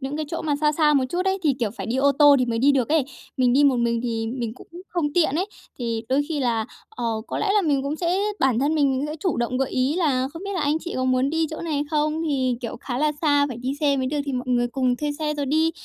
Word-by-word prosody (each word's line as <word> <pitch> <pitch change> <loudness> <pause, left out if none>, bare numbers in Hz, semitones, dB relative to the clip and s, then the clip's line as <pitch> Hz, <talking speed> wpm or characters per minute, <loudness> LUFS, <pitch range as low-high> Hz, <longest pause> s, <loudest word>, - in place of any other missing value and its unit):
những 270 +2 -4
cái 310 0 -3
chỗ 330 - -4
mà 295 -2 0
xa 300 0 +2
xa 300 -1 +3
một 265 -2 +3
chút 360 +4 -1
ấy, 385 0 +1
thì, 290 -4 +2
kiểu, 225 -4 0
phải 230 - -7
đi 240 +3 -1
ô 280 +1 +3
tô 290 0 +6
thì 255 - +1
mới 230 -1 -1
đi 280 +3 +4
được 260 -4 +1
ấy, 305 -3 +3 0.3
mình 250 -2 +3
đi 285 +3 +4
một 275 -3 +4
mình 235 -1 +1
thì 225 -2 -2
mình 235 -1 -4
cũng - - -14 0.2
không 305 -5 -1
tiện 320 -5 +2
ấy 365 +5 0 0.3
thì 230 -2 -2
đôi 275 +3 +2
khi 310 -3 -2
là, 230 -4 0 0.2
ờ, 440 - -7 0.2
có - - -4
lẽ - - 0
là 415 - +4
mình 285 -4 +1
cũng 285 +3 -2
sẽ 350 +2 0 0.2
bản 255 -4 +3
thân 280 +3 +2
mình 290 -2 +3
mình 265 -1 +1
cũng 290 - -2
sẽ 305 - -5
chủ 370 - 0
động 240 +2 -1
gợi 270 - 0
ý 260 +4 +1
là 265 -7 +1
"Không 335 +3 -8
biết 400 - -4
là 360 - -1
anh 295 +2 +1
chị 345 +2 -7
có 255 - 0
muốn 255 +2 +2
đi 325 0 +1
chỗ 315 - -6
này 300 -4 -1
không, 305 +1 0
thì, 260 -4 0
kiểu, 235 - -5
khá 245 -1 -4
là 300 0 +2
xa 290 -2 +3
phải 245 - -6
đi 255 +3 -3
xe 285 -2 +2
mới 260 -1 -1
được 295 - -2
thì 275 - -2
mọi 250 0 -3
người 240 -1 +2
cùng 250 -1 0
thuê 295 +1 -2
xe 300 0 -2
rồi 285 -2 -2
đi." 315 +3 +2
280 Hz, 305 wpm, -23 LUFS, 255-305 Hz, 0.3 s, tô